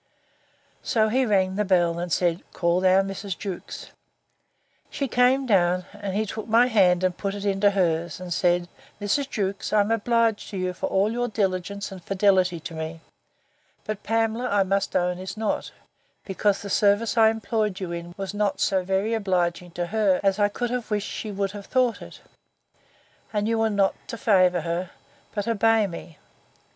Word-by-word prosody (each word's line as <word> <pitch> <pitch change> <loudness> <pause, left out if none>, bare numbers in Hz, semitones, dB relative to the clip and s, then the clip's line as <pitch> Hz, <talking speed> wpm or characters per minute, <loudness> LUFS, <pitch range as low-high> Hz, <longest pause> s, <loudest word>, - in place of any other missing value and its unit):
So 220 -2 +1
he 255 +3 +1
rung 190 -2 +1
the 210 - +2
bell, 175 -3 +2
and 175 0 -4
said, 175 0 +1
Call 170 +1 +1
down 190 +1 +4
Mrs. 195 -2 -5
Jewkes. 190 -4 -7 1.0
She 275 - -3
came 255 +2 +3
down, 180 -5 +2
and 205 -2 -5
he 215 +1 +1
took 215 +1 -6
my 230 +2 +5
hand, 185 -7 +3
and 185 -1 +1
put 200 +1 -3
it 205 0 -6
into 200 0 +3
hers; 170 -5 0
and 180 -1 -4
said, 175 0 +1 0.3
Mrs. 260 +7 0
Jewkes, 200 -4 -3
I 215 - +4
am 205 +2 -1
obliged 230 -1 +1
to 200 - -6
you 185 0 -2
for - - -3
all 195 +3 +1
your 245 +1 -1
diligence 200 -1 -2
and 185 -2 -10
fidelity 185 -3 +2
to 170 - -7
me; 160 +1 -6 0.8
but 215 -1 -4
Pamela, 225 +2 0
I 200 -1 +3
must 195 +1 -1
own, 180 0 +1
is 190 +2 -7
not; 220 -1 -2 0.6
because 200 +1 0
the 200 - -6
service 205 +4 +2
I 220 -1 +6
employed 220 -3 -1
you 185 -3 -4
in 170 0 -6
was 195 +1 -4
not 205 -1 -1
so 190 -2 +2
very 195 +4 0
obliging 180 -4 0
to 175 0 -2
her, 200 -1 +2
as 195 +1 +2
I 205 0 +3
could 240 +3 -3
have 250 -2 -3
wished 210 -2 -2
she 215 - -5
would 195 -1 -2
have 200 -1 -9
thought 255 -3 +1
it: - - -11 1.1
and 210 -1 -1
you 225 0 +1
were 225 0 +2
not 200 -2 +2
to 230 - -6
favour 185 -5 +3
her, 170 +2 -3 0.5
but 205 +1 -2
obey 225 -1 +3
me. 170 -4 -8
200 Hz, 185 wpm, -25 LUFS, 185-220 Hz, 1.1 s, I